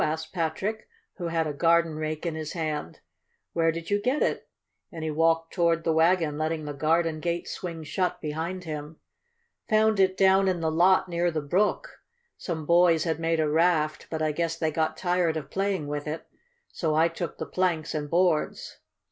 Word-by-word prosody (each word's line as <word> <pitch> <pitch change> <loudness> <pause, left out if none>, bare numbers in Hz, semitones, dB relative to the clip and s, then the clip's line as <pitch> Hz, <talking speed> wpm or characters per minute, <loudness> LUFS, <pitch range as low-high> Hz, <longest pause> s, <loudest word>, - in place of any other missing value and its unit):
asked 155 +1 -3
Patrick, 185 +6 -2 0.3
who 175 -3 -3
had 165 -1 0
a 150 - -3
garden 165 +1 +3
rake 155 +1 -4
in 170 - -1
his 155 -1 -5
hand. 155 - -4 0.5
"Where 165 -1 +2
did 165 +3 -7
you 205 0 +2
get 255 +6 +1
it?" - - -2 0.4
and 165 -4 -7
he 160 - -1
walked 165 +1 +1
toward 170 -2 +2
the 165 - +1
wagon, 160 -2 +2
letting 155 0 -2
the 145 - -4
garden 160 +2 +1
gate 170 +1 -2
swing 170 -3 -6
shut 180 +4 -1
behind 165 +5 -4
him. 155 -1 -6 0.7
"Found 215 -1 +3
it 190 0 +3
down 190 0 +4
in 185 -2 +1
the 160 -1 0
lot 180 +4 +4
near 175 0 0
the 160 -2 -2
brook. 205 - -1 0.3
Some 160 -4 -5
boys 170 -1 +4
had 160 -2 -1
made 165 0 0
a 155 - +2
raft, 155 -1 +1
but 160 -1 -2
I 155 - +1
guess 165 +1 -2
they 160 -2 0
got 160 +1 -1
tired 175 -3 +1
of 145 -2 -7
playing 195 -4 -1
with 145 +1 -4
it, 155 +2 -4 0.5
so 155 -3 -1
I 160 +2 +5
took 170 0 -5
the - - -4
planks 175 -4 -1
and 150 -2 -3
boards. 175 -2 0
165 Hz, 190 wpm, -27 LUFS, 155-175 Hz, 0.7 s, I